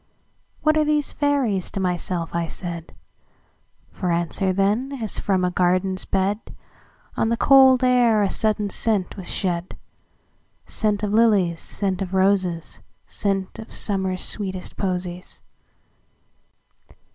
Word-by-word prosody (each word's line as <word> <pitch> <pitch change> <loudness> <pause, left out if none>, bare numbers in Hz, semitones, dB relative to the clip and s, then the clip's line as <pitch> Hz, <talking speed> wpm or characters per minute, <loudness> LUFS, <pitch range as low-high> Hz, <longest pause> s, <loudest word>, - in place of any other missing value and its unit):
"What 310 0 +3
are 310 - +4
these 300 -1 +1
fairies?" 270 -10 0
to - - -5
myself 180 -2 -2
I 170 -1 -1
said; 170 -1 -7 1.0
For 180 -2 -2
answer, 175 +3 0
then, 205 +8 0
as 225 -7 -4
from 190 -2 +1
a 180 - 0
garden's 185 +1 0
bed, 195 +2 0 0.8
On 225 - +1
the 230 - 0
cold 265 -1 +6
air 240 -4 +4
a 195 - +1
sudden 210 -2 0
scent 205 -5 0
was 190 -3 -7
shed,—Scent 195 +3 -5
of 205 0 -1
lilies, 205 -7 +3
scent 195 -2 -2
of 190 0 -3
roses, 185 -3 +1 0.3
Scent 195 -2 -2
of 220 - -10
Summer's 190 -2 -1
sweetest 190 -3 -2
posies. 180 -1 -4
195 Hz, 120 wpm, -22 LUFS, 180-220 Hz, 1.0 s, cold